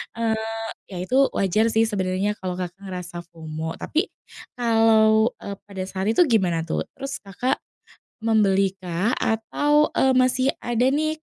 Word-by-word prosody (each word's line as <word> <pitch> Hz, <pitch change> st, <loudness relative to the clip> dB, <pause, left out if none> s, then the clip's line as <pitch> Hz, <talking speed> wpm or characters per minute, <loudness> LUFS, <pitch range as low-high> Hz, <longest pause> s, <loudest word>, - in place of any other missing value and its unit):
eee, 225 Hz, -1 st, -1 dB, 0.3 s
ya 190 Hz, -, -9 dB
itu 255 Hz, +8 st, +1 dB, 0.2 s
wajar 200 Hz, +3 st, +2 dB
sih 220 Hz, 0 st, +3 dB
sebenernya 195 Hz, 0 st, -1 dB
kalau 185 Hz, -1 st, -3 dB
Kakak 180 Hz, +1 st, -5 dB
ngerasa 180 Hz, -2 st, -6 dB
FOMO. 160 Hz, -1 st, -6 dB
Tapi 320 Hz, +3 st, 0 dB, 0.5 s
kalau, 225 Hz, -1 st, +4 dB
eee, 200 Hz, -, -5 dB
pada 195 Hz, -2 st, -6 dB
saat 190 Hz, +1 st, -4 dB
itu -, -, +6 dB
gimana 185 Hz, -, +2 dB
tuh? 160 Hz, -, -1 dB
Terus 275 Hz, +1 st, -5 dB
Kakak 220 Hz, +7 st, -1 dB, 0.7 s
membeli 195 Hz, -4 st, +3 dB
kah 185 Hz, +5 st, -1 dB
atau, 290 Hz, +7 st, +2 dB
eee, 265 Hz, 0 st, +4 dB
masih 255 Hz, +1 st, +3 dB
ada 240 Hz, 0 st, 0 dB
nih, 310 Hz, +3 st, 0 dB
220 Hz, 145 wpm, -23 LUFS, 185-240 Hz, 0.7 s, itu